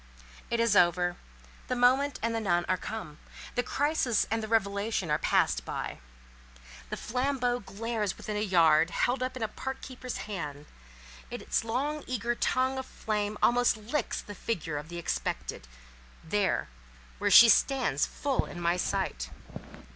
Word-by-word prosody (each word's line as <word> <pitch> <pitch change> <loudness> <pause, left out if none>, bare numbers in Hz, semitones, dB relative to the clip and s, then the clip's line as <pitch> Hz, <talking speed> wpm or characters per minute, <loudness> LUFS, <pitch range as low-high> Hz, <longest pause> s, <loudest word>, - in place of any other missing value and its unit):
It 235 - 0
is 230 -3 +3
over. 175 -1 +4 0.5
The 255 - -1
moment 260 +3 +3
and 230 0 +1
the 225 - 0
nun 175 -5 +1
are 185 - +2
come. 180 -6 -7 0.3
The 245 - +1
crisis 275 -4 +1
and 225 0 +1
the 220 - -4
revelation 200 -4 0
are 150 - +2
passed - - +2
by. - - -5 0.9
The - - -4
flambeau 250 0 0
glares 215 +1 -3
still - - -3
within 210 - -5
a - - 0
yard, 170 -5 +4
held 245 +8 0
up 255 0 -2
in 240 - -3
a - - +1
park 265 +5 -5
keeper's 255 -1 -6
hand; 150 -8 -5 0.6
its - - -2
long 280 +7 -2
eager 240 -1 -1
tongue 260 +2 +1
of 260 - -6
flame 210 -1 -2
almost 245 -1 +4
licks 225 +8 -2
the 205 - -8
figure 170 -8 -3
of 150 +2 -10
the 175 - -6
Expected—there—where - - -3 0.6
she 235 - +10
stands 240 - +3
full 280 -2 -1
in 175 - -8
my 175 +1 +1
sight. - - -2
220 Hz, 155 wpm, -29 LUFS, 175-245 Hz, 0.9 s, she